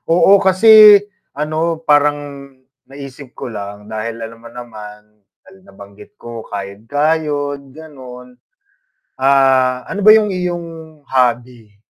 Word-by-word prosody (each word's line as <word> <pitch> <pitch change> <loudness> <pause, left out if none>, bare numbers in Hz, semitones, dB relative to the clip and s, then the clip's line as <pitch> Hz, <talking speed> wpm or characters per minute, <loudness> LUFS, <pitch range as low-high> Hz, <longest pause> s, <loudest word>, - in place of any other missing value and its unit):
Oo, 195 +2 +5
kasi 210 +2 +7 0.4
ano 160 +2 -3
parang 145 -1 +2 0.7
naisip 135 -1 -12
ko 120 - -8
lang 105 0 -9
dahil 110 +1 -5
alam 115 0 -10
mo 115 - -14
naman 110 -4 -11 0.5
tal 190 - -18
nabanggit 100 - -16
ko 115 -1 -9
kayod-kayod, 145 +8 -3
ganun. 130 -5 -13 0.8
Ah, 130 -1 +1
ano 205 - -6
ba 215 - +6
yung 215 -2 +4
iyong 175 -1 -4 0.4
hobby? 120 -4 -2
135 Hz, 110 wpm, -16 LUFS, 115-160 Hz, 0.8 s, kasi